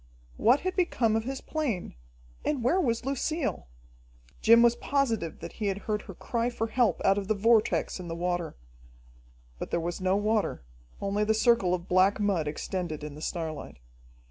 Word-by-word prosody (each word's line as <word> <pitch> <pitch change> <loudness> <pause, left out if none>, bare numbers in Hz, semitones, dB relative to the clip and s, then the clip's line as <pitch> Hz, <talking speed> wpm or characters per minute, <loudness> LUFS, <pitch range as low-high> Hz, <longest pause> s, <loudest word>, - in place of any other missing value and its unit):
What 250 +5 +4
had 370 +1 -2
become 250 - +1
of 225 0 -1
his 265 +1 -4
plane, 280 - -3 0.5
and 280 -5 -1
where 345 +10 +3
was 235 -6 -1
Lucille? 275 - -2 0.7
Jim 230 +1 +7
was 235 0 +5
positive 235 - -1
that - - -6
he 215 - -3
had 195 -1 0
heard 210 -1 -1
her 195 - -10
cry 235 +5 -1
for 230 -2 -2
help 230 -5 +1
out 195 +1 +4
of 195 - -6
the 215 - +1
vortex 220 -1 +2
in 180 - -7
the 165 - -4
water. 175 0 -2 1.0
But - - -5
there - - 0
was 170 +2 -4
no 185 +1 +2
water, 210 - 0 0.4
only 200 +1 0
the 220 +1 +2
circle 220 -5 +3
of 175 0 -8
black 185 +3 +3
mud 195 -7 +1
extended 155 0 -4
in 150 -1 -6
the 150 - -10
starlight. 160 -3 -4
210 Hz, 180 wpm, -28 LUFS, 180-235 Hz, 1.0 s, Jim